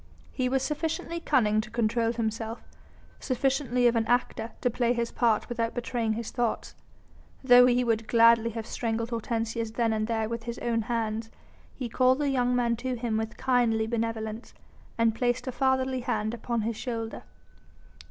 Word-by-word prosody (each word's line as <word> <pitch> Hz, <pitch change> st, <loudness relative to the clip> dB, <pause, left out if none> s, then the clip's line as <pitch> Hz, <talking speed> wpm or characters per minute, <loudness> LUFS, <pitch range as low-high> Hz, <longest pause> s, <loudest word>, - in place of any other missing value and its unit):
He 255 Hz, -2 st, -1 dB
was 265 Hz, 0 st, +1 dB
sufficiently 325 Hz, +3 st, -2 dB
cunning 215 Hz, -9 st, +2 dB
to 215 Hz, -, -10 dB
control 230 Hz, 0 st, +1 dB
himself, 225 Hz, 0 st, -3 dB, 0.6 s
sufficiently 255 Hz, -1 st, 0 dB
of 240 Hz, 0 st, +4 dB
an 225 Hz, -1 st, +1 dB
actor 240 Hz, -2 st, 0 dB
to 245 Hz, -, +2 dB
play 240 Hz, +1 st, +1 dB
his 235 Hz, -1 st, -2 dB
part 230 Hz, -3 st, +1 dB
without 230 Hz, -2 st, -2 dB
betraying 235 Hz, -2 st, -1 dB
his 230 Hz, 0 st, -5 dB
thoughts. 240 Hz, -3 st, -2 dB, 0.7 s
Though 250 Hz, -1 st, +8 dB
he 250 Hz, 0 st, +3 dB
would 225 Hz, -2 st, 0 dB
gladly 230 Hz, 0 st, +5 dB
have 225 Hz, -1 st, -5 dB
strangled 230 Hz, 0 st, -3 dB
Hortensius 230 Hz, -1 st, -2 dB
then 225 Hz, 0 st, 0 dB
and 215 Hz, 0 st, -1 dB
there 220 Hz, -1 st, -1 dB
with 230 Hz, 0 st, -5 dB
his 235 Hz, 0 st, -4 dB
own 230 Hz, -1 st, 0 dB
hands, 225 Hz, 0 st, -2 dB, 0.5 s
he 255 Hz, -, -4 dB
called 255 Hz, +2 st, +3 dB
the 290 Hz, -1 st, 0 dB
young 250 Hz, -2 st, +1 dB
man 235 Hz, -1 st, +1 dB
to 255 Hz, +1 st, -3 dB
him 235 Hz, -2 st, -2 dB
with 220 Hz, +1 st, -3 dB
kindly 235 Hz, -4 st, +2 dB
benevolence 225 Hz, 0 st, -3 dB, 0.4 s
and 230 Hz, -1 st, +3 dB
placed 245 Hz, +2 st, 0 dB
a 260 Hz, -, -2 dB
fatherly 260 Hz, 0 st, +1 dB
hand 220 Hz, -2 st, -2 dB
upon 235 Hz, 0 st, -2 dB
his 225 Hz, +1 st, -2 dB
shoulder. 225 Hz, -2 st, -4 dB
235 Hz, 170 wpm, -28 LUFS, 225-250 Hz, 0.7 s, Though